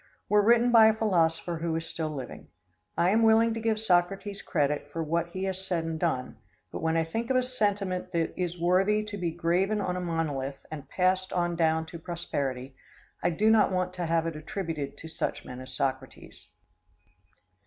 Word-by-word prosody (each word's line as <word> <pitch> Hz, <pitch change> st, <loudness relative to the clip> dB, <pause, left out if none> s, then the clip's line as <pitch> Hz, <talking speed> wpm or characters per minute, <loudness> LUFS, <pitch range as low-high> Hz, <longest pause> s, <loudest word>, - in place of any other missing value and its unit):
were 210 Hz, 0 st, +4 dB
written 235 Hz, +3 st, +4 dB
by 225 Hz, -2 st, +8 dB
a 220 Hz, -, +3 dB
philosopher 175 Hz, -5 st, +1 dB
who 165 Hz, 0 st, -2 dB
is 165 Hz, 0 st, -2 dB
still 160 Hz, -1 st, -3 dB
living. 135 Hz, -5 st, -7 dB, 0.5 s
I 175 Hz, +2 st, +3 dB
am 220 Hz, +2 st, +3 dB
willing 225 Hz, 0 st, +5 dB
to 225 Hz, -, -3 dB
give 220 Hz, -1 st, 0 dB
Socrates 195 Hz, 0 st, 0 dB
credit 145 Hz, -2 st, -1 dB
for 165 Hz, +1 st, -3 dB
what 170 Hz, +2 st, 0 dB
he 185 Hz, +2 st, -5 dB
has 190 Hz, 0 st, -3 dB
said 175 Hz, -3 st, -1 dB
and 165 Hz, -1 st, -4 dB
done, 155 Hz, -7 st, -1 dB, 0.3 s
but -, -, -5 dB
when 160 Hz, 0 st, +1 dB
I 165 Hz, -, +3 dB
think 225 Hz, +9 st, -4 dB
of 260 Hz, -, +2 dB
a 255 Hz, -, +3 dB
sentiment 205 Hz, -7 st, 0 dB
that 165 Hz, -1 st, -1 dB
is 180 Hz, -1 st, -3 dB
worthy 190 Hz, +5 st, +3 dB
to 210 Hz, -1 st, -7 dB
be 180 Hz, -4 st, -2 dB
graven 175 Hz, +5 st, 0 dB
on 180 Hz, -3 st, -1 dB
a 180 Hz, -, -3 dB
monolith 145 Hz, -6 st, -3 dB
and 150 Hz, -3 st, -7 dB
passed 185 Hz, 0 st, +1 dB
on 175 Hz, -1 st, 0 dB
down 160 Hz, -1 st, +2 dB
to 165 Hz, +1 st, -9 dB
prosperity, 140 Hz, -6 st, -4 dB, 0.5 s
I -, -, +2 dB
do 210 Hz, +6 st, +3 dB
not 215 Hz, -3 st, +4 dB
want 185 Hz, 0 st, -1 dB
to 180 Hz, -2 st, -3 dB
have 165 Hz, 0 st, +1 dB
it 165 Hz, -1 st, -3 dB
attributed 155 Hz, -3 st, -5 dB
to 160 Hz, -, -9 dB
such 160 Hz, -, -3 dB
men 125 Hz, 0 st, -8 dB
as 130 Hz, 0 st, -9 dB
Socrates. 130 Hz, 0 st, -4 dB
175 Hz, 195 wpm, -28 LUFS, 160-200 Hz, 0.5 s, by